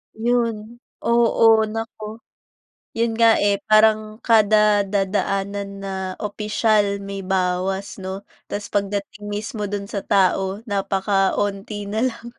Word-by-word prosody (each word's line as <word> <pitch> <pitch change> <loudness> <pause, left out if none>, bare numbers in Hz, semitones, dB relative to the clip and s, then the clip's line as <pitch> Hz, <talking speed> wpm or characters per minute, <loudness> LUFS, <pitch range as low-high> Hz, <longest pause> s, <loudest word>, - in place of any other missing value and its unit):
'Yon, 235 0 +1 0.5
oo. 235 -1 +4 0.2
Naku! 225 -1 -6 0.8
Yun 230 0 +1
nga, 230 -1 +6
eh, 200 -1 +1
parang 215 0 +4
kada 215 -2 +4
dadaanan 200 0 -1
na 195 -1 -4 0.3
opisyal 210 -1 +1
may 195 0 -6
bawas 190 +1 -1
'no? 190 +1 -6 0.2
Tas 205 0 -6
pagdating 205 +1 -3
mismo 210 0 -4
dun 200 0 -4
sa 200 - -3
tao, 195 +1 +1
napakaunti 200 0 -1
na 220 - -1
lang. 235 -1 -8
205 Hz, 110 wpm, -21 LUFS, 195-215 Hz, 0.8 s, nga